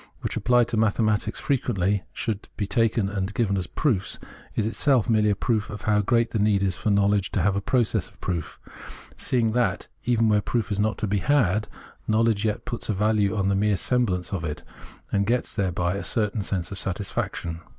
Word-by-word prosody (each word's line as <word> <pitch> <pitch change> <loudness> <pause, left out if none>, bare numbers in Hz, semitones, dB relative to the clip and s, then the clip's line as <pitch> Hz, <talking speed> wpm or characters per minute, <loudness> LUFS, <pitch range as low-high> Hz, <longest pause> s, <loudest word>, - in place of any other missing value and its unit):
which - - -3
applied 120 -1 +2
mathematics 110 0 +1
fre 145 - 0
Preface 135 - -1
43 120 - 0
quently 95 +1 +1
gives, - - -27
should 110 -3 -4
be 105 - -1
taken 115 0 +1
and 95 0 -2
given 105 -4 +1
as 90 -2 -1
proofs, 110 - -1 0.4
is 110 - +1
itself 125 +2 +2
merely 110 -2 +3
a 100 - +2
proof 110 +1 -1
of 105 - -7
how 105 -1 +3
great 115 +2 +1
the 110 - -1
need 100 -1 +2
is 95 -2 +1
for 105 - -2
know 100 -1 +3
ledge 100 -1 +1
to - - 0
have 100 -1 +2
a 100 - 0
process 120 +1 +1
of - - -23
proof, 85 -4 -4 0.6
seeing 115 -3 +1
that, 120 +1 0 0.2
even 115 -2 +3
where 105 -1 +3
proof 115 +1 -2
is 100 - -1
not 110 +1 +1
to - - -2
be 100 0 0
had, 105 -3 +2 0.4
knowledge 110 -1 +2
yet 105 -1 -1
puts 120 - -5
a - - +2
value 105 0 +2
on 100 -1 +1
the 100 - +2
mere 100 0 +2
semblance 100 -5 0
of 90 -4 -2
it, 75 -2 -4 0.5
and 100 0 +1
gets 120 +2 0
thereby 90 -2 0
a 100 - -4
certain 105 -2 +1
sense 95 -2 -2
of 100 - -6
satisfaction. 90 -3 -3
105 Hz, 215 wpm, -25 LUFS, 100-115 Hz, 0.6 s, merely